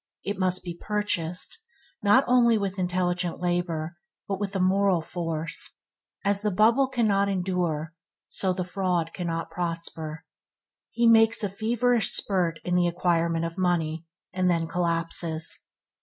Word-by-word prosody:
It 200 -1 -3
must 185 -1 +1
be 175 -2 -6
purchased, 205 - -1 0.4
not 205 +6 +5
only 240 -2 +4
with 200 -2 -3
intelligent 180 -1 -1
labor, 175 -2 -2 0.3
but 195 -1 -2
with 200 -1 -2
moral 190 0 +3
force. 165 -1 -2 0.5
as 200 0 +2
the 210 - +1
bubble 230 +7 +4
cannot 210 -6 +1
endure, 175 -4 -1 0.3
so 190 - +1
the 180 0 -2
fraud 180 -3 -1
cannot 165 -2 -3
prosper. 165 -2 -4 0.6
He 235 - 0
makes 225 -1 +5
a 205 - 0
feverish 230 +3 +1
spurt 175 -5 +2
in 180 - -2
the 180 0 +3
acquirement 170 -1 0
of 165 +2 -6
money, 165 -3 0 0.3
and 185 -1 +1
then 165 -2 +1
collapses. 165 -1 -2
180 Hz, 135 wpm, -26 LUFS, 170-200 Hz, 0.6 s, not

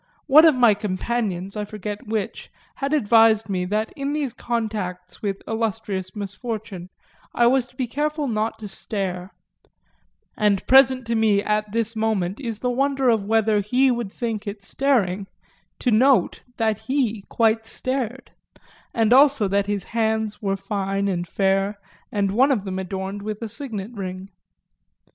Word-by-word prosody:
One 305 +3 +7
of 315 -4 +6
my 240 -4 +5
companions, 200 -1 -3
I 210 - -2
forget 210 0 -6
which, 215 -2 -3 0.3
had 275 0 -2
advised 225 -5 +4
me 180 -1 -1
that 215 +4 -2
in 280 +1 -3
these 290 -5 -2
contacts 210 -7 -4
with 200 -2 -3
illustrious 220 -4 -3
misfortune 205 -2 -6 0.5
I 240 - +4
was 250 0 +3
to 250 - -25
be 255 - -1
careful 295 +4 -2
not 220 -1 -1
to 220 -1 -7
stare; 190 -2 -4 1.1
and 205 -2 +1
present 260 -1 +5
to 230 - -1
me 215 -3 +3
at 210 0 -1
this 230 +1 -1
moment 215 -4 -1
is 230 -6 -4
the 250 - 0
wonder 270 0 +1
of 220 -4 +2
whether 220 0 +2
he 250 +6 +2
would 235 -5 -3
think 220 -2 -4
it 200 0 -6
staring 200 -6 0 0.5
to 245 - 0
note 255 +4 +3 0.2
that 220 -2 +1
he 250 -6 0
quite 225 -1 +1
stared, 255 +1 -4 0.6
and 225 0 +3
also 275 -5 +5
that 200 +1 +1
his 205 -2 -1
hands 220 -2 -1
were 195 -2 -1
fine 195 0 -2
and 175 -2 -2
fair 195 +2 +1 0.3
and 200 -2 0
one 260 +7 +4
of 225 -8 +1
them 190 -1 -3
adorned 190 +1 -4
with 210 0 -5
a - - -3
signet 220 -3 -5
ring. 190 -2 -6
220 Hz, 155 wpm, -23 LUFS, 200-240 Hz, 1.1 s, One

